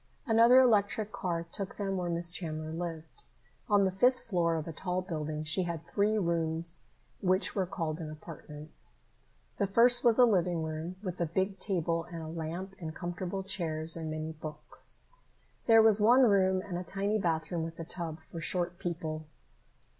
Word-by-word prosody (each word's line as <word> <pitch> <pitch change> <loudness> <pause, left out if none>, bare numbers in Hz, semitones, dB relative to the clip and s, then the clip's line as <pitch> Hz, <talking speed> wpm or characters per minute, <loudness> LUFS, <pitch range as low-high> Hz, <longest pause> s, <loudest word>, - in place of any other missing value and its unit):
Another 230 +1 +6
electric 215 -3 +3
car 180 -8 -2
took 195 -1 -4
them 195 -2 -2
where 180 -2 -2
Miss 170 0 0
Chandler 155 -3 -3
lived. 165 - -5 0.4
On 205 -1 +4
the 190 - +1
fifth 250 +7 +3
floor 170 -5 0
of 160 0 -3
a 165 - -5
tall 180 +2 -2
building, 155 -3 -4
she 160 +5 +1
had 170 -2 -4
three 205 +5 +1
rooms 170 -2 0 0.4
which 185 0 +2
were 190 -3 0
called 165 -2 -3
an 160 -2 -5
apartment. 155 -1 -10 0.9
The 200 - +2
first 240 +5 +6
was 235 -2 +5
a 250 - +8
living 180 -6 +1
room, 160 +3 -4
with 180 -3 -4
a 170 - +1
big 190 +4 -1
table 165 -4 -1
and 170 -2 -7
a - - -6
lamp 170 +4 -5
and 160 -3 -6
comfortable 180 +2 -4
chairs 165 -4 0
and 160 -1 -4
many 155 0 -4
books. 155 -1 -5 0.7
There 225 -1 +7
was 220 -1 +5
one 245 +5 +6
bedroom 190 -4 +4
and 175 -3 -3
a - - -5
tiny 200 +3 -1
bathroom 165 -1 -1
with 165 +1 -6
a 165 - -5
tub 165 -2 -6
for 165 +1 -9
short 175 +1 -1
people. 155 -3 -4
175 Hz, 175 wpm, -31 LUFS, 160-195 Hz, 0.9 s, a